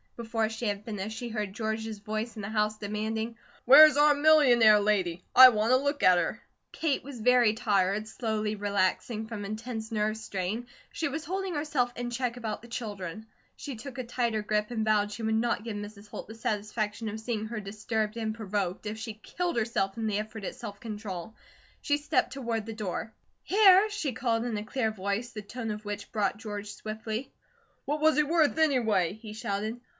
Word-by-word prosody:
Before 225 -1 -1
she 225 +2 -5
had 205 0 -2
finished, 215 -1 -5
she 240 +1 -5
heard 210 -3 -3
George's 220 0 -3
voice 215 +3 -4
in 215 - -6
the 195 - -4
house 215 0 0
demanding: 220 +2 -3 0.3
"Where's 295 +3 +9
our 295 0 +6
millionaire 265 -8 +6
lady? 190 -4 0
I 255 0 +12
want 220 +1 +2
a - - +7
look 285 +2 -1
at 180 -1 +7
her." - - -2 0.3
Kate 310 -4 -1
was 270 -3 -8
very 240 -1 +4
tired, 210 -2 +1
slowly 215 -1 -2
relaxing 205 +2 0
from 215 -2 -6
intense 220 +1 -5
nerve 215 0 0
strain, 215 +2 -4 0.2
she 330 - -2
was 300 +2 -4
holding 380 +1 -3
herself 290 -5 0
in 245 0 -3
check 245 0 -2
about 220 -3 -4
the 235 - -13
children. 215 -4 -6 0.3
She 280 -3 -6
took 245 +4 -9
a 255 - -2
tighter 235 -3 -1
grip, 210 0 0
and 225 -3 -2
vowed 210 -1 +2
she 225 +2 -6
would 220 0 +1
not 230 0 0
give 225 -2 -5
Mrs. 205 0 -8
Holt - - -8
the 220 - -9
satisfaction 215 0 -2
of 215 +1 -5
seeing 220 -1 -3
her 230 0 -4
disturbed 215 +2 -3
and 220 -2 -2
provoked, 205 -3 -3
if 215 +1 -4
she 220 0 -5
killed 345 +11 -3
herself 215 -3 0
in 225 - -2
the 210 -1 0
effort 215 0 -6
at - - -4
self 210 -4 -8
control. 210 -3 -6 0.5
She 290 - +1
stepped 295 -3 0
toward 230 -5 -3
the 225 - -4
door. 215 0 -4 0.3
"Here," 395 0 +6
she 405 -11 -2
called 230 -1 0
in 230 -3 -2
a 210 - -3
clear 225 -1 -1
voice, 200 +3 -2
the 215 - -6
tone 225 +2 -5
of 210 0 -6
which 205 0 -5
brought 205 -2 0
George 210 -2 -6
swiftly. 220 +3 -5 0.5
"What 295 +2 -2
was 315 -2 +4
he 300 - +5
worth, 315 0 +2
anyway?" 225 - +2
he 215 0 -10
shouted. 215 +2 -3
220 Hz, 195 wpm, -29 LUFS, 210-245 Hz, 0.5 s, I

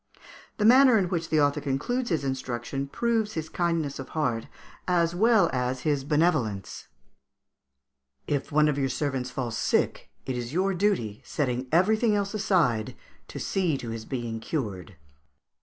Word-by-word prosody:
] - - -20
The 210 - +1
manner 255 +1 +7
in 185 -4 +1
which 170 -3 -2
the 155 - +3
author 145 0 +2
concludes 150 - -1
his 160 -6 0
instruction 130 0 -3
proves 225 +5 0
his 160 -1 -4
kindness 165 -5 -1
of 135 - -7
heart, 120 -7 0 0.4
as 170 -2 +2
well 215 0 +4
as 125 0 -1
his 145 -1 0
benevolence: 145 - 0 1.4
"If 145 0 -2
one 150 +1 +4
of 145 -1 0
your 135 -1 +1
servants 135 -3 -2
fall 125 -2 -3
sick, 115 - 0 0.2
it 130 - -3
is 120 +2 -5
your 190 +3 +1
duty, 175 - 0
setting 130 -3 -2
everything 215 +6 +3
else 200 0 -1
aside, 165 - +1 0.3
to - - -9
see 180 -7 0
to 120 - -7
his 115 -1 -6
being 120 -4 -4
cured." 105 - -4
150 Hz, 155 wpm, -27 LUFS, 125-185 Hz, 1.4 s, manner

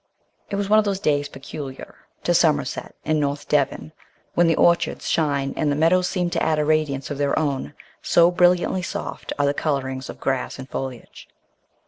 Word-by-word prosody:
It - - -2
was 200 0 -1
one 215 +1 +5
of 215 - +1
those 200 -2 -1
days 145 -5 0
peculiar 135 0 -8 0.3
to - - +2
Somerset - - +1
and 155 -1 +1
North 145 0 -2
Devon, 150 +1 0 0.4
when 175 0 +4
the 165 - +3
orchards 170 0 +2
shine 140 -4 0
and 150 -2 0
the - - +1
meadows 175 +4 +3
seem 180 -2 -1
to - - -1
add 160 -1 +2
a 150 - +1
radiance 150 -3 0
of 145 - -4
their 140 -1 +1
own, 145 -2 -1 0.3
so 170 +1 +4
brilliantly 180 +1 +3
soft 175 - -5
are 145 - +2
the 140 - +2
colourings 130 -3 -2
of - - -8
grass 130 -1 -2
and 130 - -8
foliage. 130 -3 -7
150 Hz, 185 wpm, -23 LUFS, 140-170 Hz, 0.4 s, one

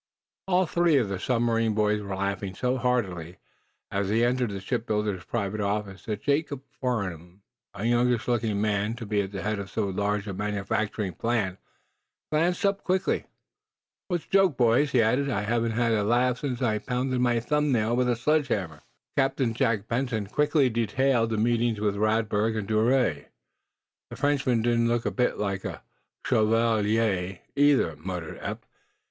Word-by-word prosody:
All 185 0 +3
three 170 -2 +3
of 120 -7 +1
the 95 -2 -3
submarine 115 -2 +1
boys 105 0 +1
were 100 -2 -4
laughing 100 0 -3
so 125 +4 0
heartily, 95 -10 -1 0.5
as 100 0 -1
they 115 +3 +3
entered 125 -1 +1
the 100 -1 -5
shipbuilder's 105 -1 -2
private 105 -2 -2
office 100 -1 -3
that 105 -2 -4
Jacob 145 -1 0
Farnum, 95 - -4 0.3
a 100 +2 -4
youngish 120 0 +2
looking 115 -4 0
man 105 +1 0
to 115 0 -7
be 105 -1 +1
at 95 -1 -5
the 95 -1 -5
head 105 -1 -1
of 100 -1 -6
so 110 0 -1
large 100 +2 -1
a 100 - -4
manufacturing 105 0 -2
plant, 105 -5 -1 0.7
glanced 175 +7 +1
up 200 0 +1
quickly. 185 0 0 0.8
"What's 175 -3 -2
the - - -33
joke, 195 -8 +4
boys?" 125 +4 +3
he 120 -4 +4
asked. 130 +6 +1
"I 105 -6 0
haven't 115 +1 0
had 115 0 +1
a 105 -2 +1
laugh 125 +3 +2
since 130 -3 -3
I 110 -3 +1
pounded 125 +1 -1
my 120 -1 +2
thumbnail 120 -4 +1
with 125 0 +1
a 120 - +2
sledge 150 +5 +1
hammer." 85 - -3 0.3
Captain 135 -3 +1
Jack 110 -2 0
Benson 115 -3 -1
quickly 145 +6 +2
detailed 115 +1 +1
the 110 - -1
meetings 115 0 +1
with 105 -1 0
Radberg 110 +1 +1
and 105 -2 -3
d'Ouray. 110 - +1 0.8
"The - - -8
Frenchman 140 -5 +1
didn't 115 0 +2
look 120 0 0
a - - 0
bit 125 -1 0
like 100 -2 -2
a - - -6 0.4
'shovelee' 110 -4 +1
either," 140 - +3
muttered 85 0 -6
Eph. - - -5
115 Hz, 165 wpm, -26 LUFS, 105-125 Hz, 0.8 s, joke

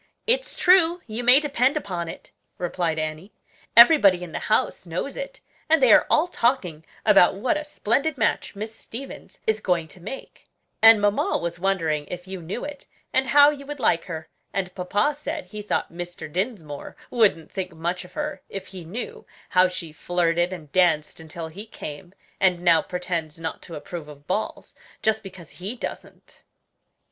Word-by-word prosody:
"It's - - +1
true, 355 -1 +5
you 225 +1 -4
may 250 +3 +8
depend 280 -1 +1
upon 180 - -4
it," 165 - -9 0.3
replied 175 -2 -1
Annie; 155 +5 -4 0.4
"everybody 210 - +8
in 175 - -8
the - - -3
house 215 -4 +1
knows 175 +12 -3
it, - - -7 0.3
and 320 0 +5
they 255 -5 +6
are - - +6
all 310 - +4
talking 235 - 0 0.2
about 195 -5 +6
what 255 +11 0
a 300 - -2
splendid 285 +1 0
match 220 - 0
Miss 215 +2 -5
Stevens 250 +4 -9
is 220 0 +1
going 175 -5 0
to 180 - -13
make; 220 +9 -9 0.3
and 225 -1 +9
mamma 205 0 +2
was 170 +1 -4
wondering 165 -6 0
if 180 +1 -7
you 190 -1 -6
knew 180 - -5
it, 290 -1 -9 0.3
and 260 0 +2
how 290 +1 +7
you 285 -2 -8
would 295 -1 -6
like 165 -8 +2
her; 160 -2 -6 0.2
and 185 -2 -2
papa 205 +10 0
said 300 0 -4
he 210 -1 -8
thought 205 - -2
Mr. 175 -1 -6
Dinsmore 170 - -4 0.2
wouldn't 210 -9 +2
think 190 -1 -4
much 170 +3 -3
of 180 - -15
her 300 -1 -4
if 195 -1 -6
he 185 -2 -9
knew 195 +10 -7 0.2
how 185 0 +5
she 170 -3 -6
flirted 175 +1 0
and 160 -6 -8
danced 170 -4 +2
until 160 +1 -7
he 200 +7 -9
came, 175 0 -9 0.2
and 180 -2 +2
now 165 -3 +5
pretends 170 -3 -4
not 165 -1 -5
to 170 - -9
approve 160 +1 -7
of 145 -1 -13
balls, 190 +6 -3 0.3
just 220 0 +2
because 190 -5 -11
he 200 +7 -4
doesn't." - - -9
190 Hz, 175 wpm, -24 LUFS, 170-245 Hz, 0.4 s, and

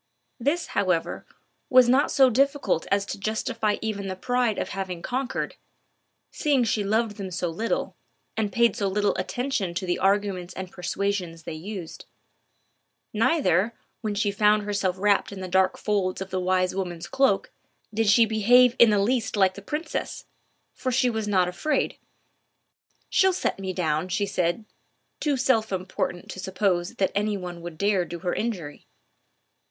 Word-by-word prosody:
This, 290 +8 0
however, 180 -4 0 0.4
was 255 -3 +7
not 260 +3 +4
so 265 -2 +5
difficult 275 - +1
as 200 0 +2
to 200 - -6
justify 215 0 -1
even 205 -3 -3
the 190 - -3
pride 245 +2 0
of - - -2
having 185 -3 -5
conquered, 255 +1 -3 0.7
seeing 280 -4 +2
she 220 -2 0
loved 215 +1 0
them 195 -2 -5
so 180 -1 -2
little, 215 +8 -2 0.4
and 215 -2 -1
paid 235 -1 +3
so 205 -4 -1
little 205 +1 +1
attention 245 -9 -2
to 185 - -2
the 180 - -1
arguments 195 -2 0
and 185 -1 -6
persuasions 180 -2 -3
they 165 - -6
used. 175 +1 -7 1.1
Neither, 220 - +2 0.3
when 215 -3 -2
she 205 0 +1
found 210 +1 +3
herself 200 -3 -1
wrapped 200 +1 +2
in 200 - -7
the 185 - -5
dark 190 +1 +2
folds 200 -3 -1
of 190 0 -6
the 185 - -1
wise 185 0 +1
woman's 175 -3 -4
cloak, 270 -8 +1 0.4
did 220 0 +2
she 230 +3 +6
behave 240 +3 +5
in 235 - +8
the 210 - +3
least 220 +2 0
like 190 -2 +4
the 200 - -10
princess, 305 - -4 0.5
for 255 - -3
she 250 0 +2
was 220 -2 -3
not 185 -3 +3
afraid. 180 - -1 1.1
"She'll 380 0 +3
soon 360 - -4
set - - -19
me 190 -1 -3
down," 160 -2 -1
she 200 +2 0
said, 180 +1 -1 0.5
too 290 -3 0
self 240 -5 +2
important 185 -1 -3
to - - -8
suppose 185 -2 -1
that 190 - +1
any 210 0 0
one 175 -2 -7
would 170 -2 -8
dare 200 0 +2
do 170 0 -6
her 180 -2 -1
an - - -2
injury. 180 -11 -5
200 Hz, 170 wpm, -25 LUFS, 185-230 Hz, 1.1 s, in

